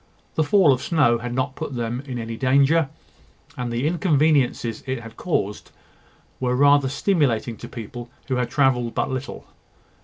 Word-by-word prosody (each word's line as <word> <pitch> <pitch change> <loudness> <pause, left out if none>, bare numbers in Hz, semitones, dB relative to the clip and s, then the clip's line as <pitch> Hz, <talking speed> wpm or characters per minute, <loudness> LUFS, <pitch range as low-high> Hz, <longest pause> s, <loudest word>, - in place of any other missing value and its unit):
The 160 - +1
fall 155 -2 +5
of 130 - -3
snow 145 -8 +2
had 120 +1 -5
not 130 +1 -1
put 150 -4 -5
them 120 +1 -3
in 125 -2 -4
any 115 -1 -5
danger, 140 +5 +3 0.7
and 125 -1 -4
the 120 +4 -1
inconveniences 150 - +1
it 130 -1 -2
had 115 -1 -11
caused 105 - -2 0.7
were 125 -1 0
rather 140 0 +4
stimulating 140 - 0
to - - -9
people 120 +1 -8 0.2
who 130 - -1
had 125 -1 -1
travelled 125 -3 +1
but - - -1
little. 130 +1 -5
130 Hz, 160 wpm, -23 LUFS, 120-145 Hz, 0.7 s, fall